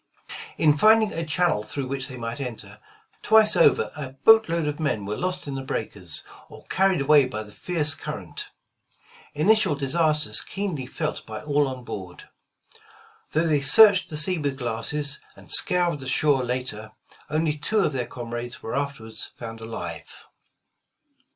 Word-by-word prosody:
In 150 -2 +4
finding 220 +4 +5
a 165 - -3
channel 165 -6 +1
through 110 +6 -5
which 135 0 -4
they 130 - -9
might 115 +2 -5
enter, 125 -5 -7 0.4
twice 220 -1 +5
over - - +4
a 145 -4 -6
boat 220 +10 +5
load 165 -1 0
of 150 +1 -3
men 110 -10 -1
were 105 +1 -3
lost 185 0 -3
in 140 - -4
the 135 - -4
breakers, 100 -9 -3 0.3
or - - -14
carried 190 -4 +2
away 145 -1 +5
by 110 -4 -5
the 105 - -14
fierce 155 +2 -1
current, - - -7 0.4
— - - -26
initial 215 -5 +4
disasters 150 +2 +1
keenly 180 -10 -4
felt 155 +3 -4
by - - -7
all 145 -1 +1
on 130 -1 -6
board. 95 -6 -8 1.1
Though 160 +2 +2
they 150 -3 +2
searched 190 +5 +6
the 155 - -3
sea 170 +3 +1
with 140 -3 -2
glasses, 135 +4 -2 0.2
and - - -14
scoured 175 -4 +3
the 130 - -8
shore 140 0 +2
later, 125 -4 -4 0.4
only 155 0 0
two 210 +8 +1
of 155 - 0
their 125 -2 -2
comrades 120 0 -7
were 115 - -4
afterward 140 -6 -4 0.2
found 115 -1 -8
alive. 85 -8 -8
145 Hz, 165 wpm, -24 LUFS, 120-165 Hz, 1.1 s, searched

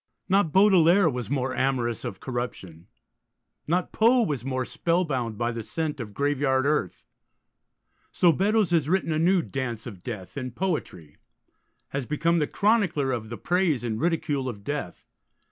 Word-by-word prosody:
Not 190 -4 +2
Baudelaire 190 -1 +5
was 125 -5 -3
more 130 -2 -1
amorous 125 -4 -1
of 95 - -5
corruption; 95 -9 -6 0.8
not 175 +3 0
Poe 235 +2 +4
was 145 - -2
more 130 -1 -2
spellbound 135 - -1
by 120 +1 0
the 115 -1 -5
scent 150 +7 -3
of 105 -4 -7
graveyard 140 -2 +1
earth. 140 - -1 1.1
So 175 - +4
Beddoes 200 +3 +1
has 160 -4 +2
written 185 -2 +1
a 155 - 0
new 175 +1 +3
Dance 120 -4 -4
of 100 -7 -9
Death, 105 0 -7
in 130 -3 -4
poetry; 125 - -4 0.7
has 135 -3 -4
become 165 +3 +1
the 150 - +1
chronicler 190 - +1
of 115 -3 -4
the 120 - -6
praise 175 -8 +1
and 110 -1 -3
ridicule 150 -5 0
of 100 -4 -8
Death. 145 -8 -5
140 Hz, 155 wpm, -26 LUFS, 120-170 Hz, 1.1 s, Baudelaire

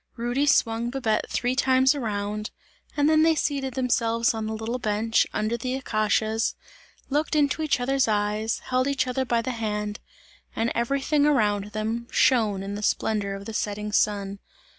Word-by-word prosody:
Rudy 245 +4 -1
swung 230 -3 +2
Babette 240 -4 -1
three 250 +1 -1
times 260 +1 +4
around, 210 -5 -3 0.5
and 290 0 +3
then 310 0 +4
they 325 0 +4
seated 275 -4 -2
themselves 230 -3 +1
on 220 -1 -3
the 220 - -3
little 225 +3 -3
bench, 220 0 +1
under 215 +2 -1
the 255 +2 -3
acacias, 220 -2 0 0.6
looked 300 +2 0
into 295 +1 +2
each 305 -4 +1
other's 270 +1 +1
eyes, 210 +1 0
held 255 +1 +2
each 280 -2 +1
other 255 +1 -1
by 235 -2 0
the 255 - -2
hand, 210 -2 -3 0.6
and 230 +1 0
everything 275 +4 +1
around 210 -8 +2
them 220 +3 -3
shone 215 -6 +2
in 200 +1 -5
the 205 - -5
splendour 205 -1 0
of 195 0 -9
the 225 - -6
setting 210 0 -3
sun. 200 -1 0
230 Hz, 165 wpm, -25 LUFS, 210-260 Hz, 0.6 s, times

